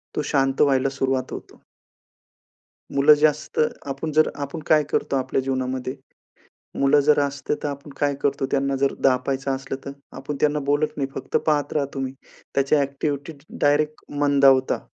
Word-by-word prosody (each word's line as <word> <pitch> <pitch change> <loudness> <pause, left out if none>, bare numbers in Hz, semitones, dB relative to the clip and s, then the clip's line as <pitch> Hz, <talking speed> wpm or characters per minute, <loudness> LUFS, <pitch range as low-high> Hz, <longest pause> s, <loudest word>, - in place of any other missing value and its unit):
तो - - 0
शांत 135 -1 +1
व्हायला 135 -2 +3
सुरुवात 135 -1 -1
होतो. - - -10 1.3
मुलं 140 +2 +7
जास्त 150 0 0 0.3
आपण 140 +3 -4
जर 155 +1 +4 0.2
आपण 150 +4 -7
काय 155 -1 +5
करतो 140 - 0
आपल्या 130 0 0
जीवनामध्ये? 130 -1 -2 0.9
मुलं 140 +1 +4
जर 150 -1 +5
असते 140 0 -1
तर - - 0
आपण 140 +1 -6
काय 145 -1 +1
करतो, 140 -1 0
त्यांना 140 0 +1
जर 135 0 +1
दाबायचं 135 +1 +1
असलं 135 0 -5
तर 140 - -5 0.3
आपण 135 +2 -5
त्यांना 150 0 +2
बोलत 150 +1 0
नाही. 135 -2 -2
फक्त - - -1
पाहत 145 -2 +1
राहा 145 -2 +1
तुम्ही 135 -1 -3 0.4
त्याची 140 +2 +3
ॲक्टिव्हिटी 140 +1 -2 0.3
डायरेक्ट 150 +1 +2 0.2
मंदावता. 140 -2 +4
140 Hz, 155 wpm, -23 LUFS, 135-145 Hz, 1.3 s, मुलं